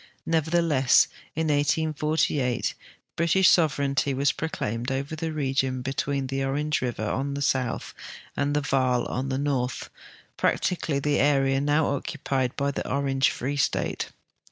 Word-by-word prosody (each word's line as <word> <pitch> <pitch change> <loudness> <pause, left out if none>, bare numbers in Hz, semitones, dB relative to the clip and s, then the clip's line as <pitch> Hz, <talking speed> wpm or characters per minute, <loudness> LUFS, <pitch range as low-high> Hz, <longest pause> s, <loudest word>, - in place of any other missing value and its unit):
Nevertheless, 160 -4 +3 0.3
in 160 0 0
1848; 150 -3 +1 0.4
British 170 +3 +4
sovereignty 140 -4 +2
was 140 +2 +2
proclaimed 120 -5 -3
over 140 +4 -3
the 160 +1 -3
region 135 -3 -1
between 135 +1 -1
the 135 +1 -2
Orange 150 +3 0
river 120 -3 -2
on 140 +5 -2
the 140 - -4
south 130 -3 -1 0.4
and 145 +1 0
the 150 - +2
Vaal 130 -3 +1
on 130 +2 -3
the 130 - -1
north, 135 -3 -2 0.5
practically 165 -5 0
the 145 +1 +1
area 135 -1 +3
now 145 +2 +2
occupied 130 -2 -2
by 140 0 0
the - - -4
Orange 135 -1 +2
Free 140 +4 -3
State. 140 - -1
140 Hz, 135 wpm, -26 LUFS, 135-150 Hz, 0.5 s, British